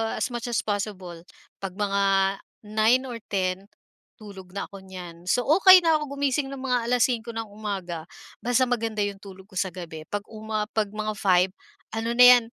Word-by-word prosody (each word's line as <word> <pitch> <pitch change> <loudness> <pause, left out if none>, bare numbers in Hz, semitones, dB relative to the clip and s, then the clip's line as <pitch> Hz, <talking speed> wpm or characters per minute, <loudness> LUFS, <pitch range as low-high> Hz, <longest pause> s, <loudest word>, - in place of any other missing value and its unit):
as 255 - -2
much 240 0 -4
as 240 - 0
possible, 195 -4 -4 0.4
pag 190 -2 -6
mga 200 -1 0 0.6
9 220 +4 +3
or 245 -3 -6
10, 190 0 -1 0.5
tulog 195 -3 -12
na 200 - -2
ko 195 - -9
niyan, 180 -2 -10
so 245 +6 +2
okey 370 +3 +7
na 320 -2 +4
ako 280 -2 -6
gumising 280 0 0
ng 270 -1 -7
mga 245 -3 0
5:00 235 -1 +1
ng 225 -2 -5
umaga, 190 -6 -5 0.3
basta 245 +1 +2
maganda 225 -4 0
'yong 200 -1 -3
tulog 190 -1 -12
ko 190 -2 -6
sa 190 - +1
gabi, 160 -3 -8
'pag 205 0 -3
uma 215 0 -3
'pag 215 -2 0
mga 215 +1 -3
5 185 -1 +3 0.4
ano 225 +2 -2
na 250 - +7
'yan, 245 -1 +9
215 Hz, 180 wpm, -25 LUFS, 190-245 Hz, 0.6 s, yan